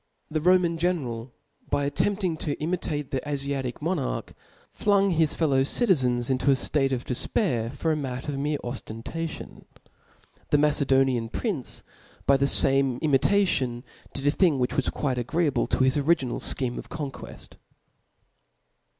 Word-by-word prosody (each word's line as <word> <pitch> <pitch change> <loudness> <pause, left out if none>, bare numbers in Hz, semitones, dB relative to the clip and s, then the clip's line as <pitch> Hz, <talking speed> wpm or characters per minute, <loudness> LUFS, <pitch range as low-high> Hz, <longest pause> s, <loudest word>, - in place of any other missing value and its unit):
The 155 0 -1
Roman 175 -1 +3
general, 130 -9 -2 0.4
by 145 0 +1
attempting 190 +4 0
Co 150 -1 -3
imitate 155 -3 -3
the 135 - 0
Afiatic 140 -2 -3
monarch, 165 -5 -2 0.4
flung 200 -1 +2
his 160 -3 +2
fellow 140 -5 +2
cid*' 225 - +3
zens 125 -5 +2
into 130 +2 +1
a 135 - +6
ftate 135 0 0
of 125 -2 -2
defpair 120 - -1
for 160 +3 -1
9 150 - -2
matter 130 +1 -4
of 135 - -4
mere 145 +1 0
oftentation 120 +6 -6
^ - - -22 0.7
the 145 - +4
Macedonian 135 -5 +2
prince, 175 - -3 0.4
by 140 - +5
the 140 +1 +2
fame 135 -2 +4
imitation, 140 -5 +2 0.3
did 135 - -6
a 145 - +5
thing 165 -3 +3
which 125 -1 -1
was 140 - +1
quite 130 -4 -2
agreeable 140 +1 0
to - - +1
his 130 +2 +3
origii^al 140 -4 +1 0.2
^heme 125 -3 -3
of - - -10
conqueft. 150 -4 -7
140 Hz, 150 wpm, -26 LUFS, 130-160 Hz, 0.7 s, a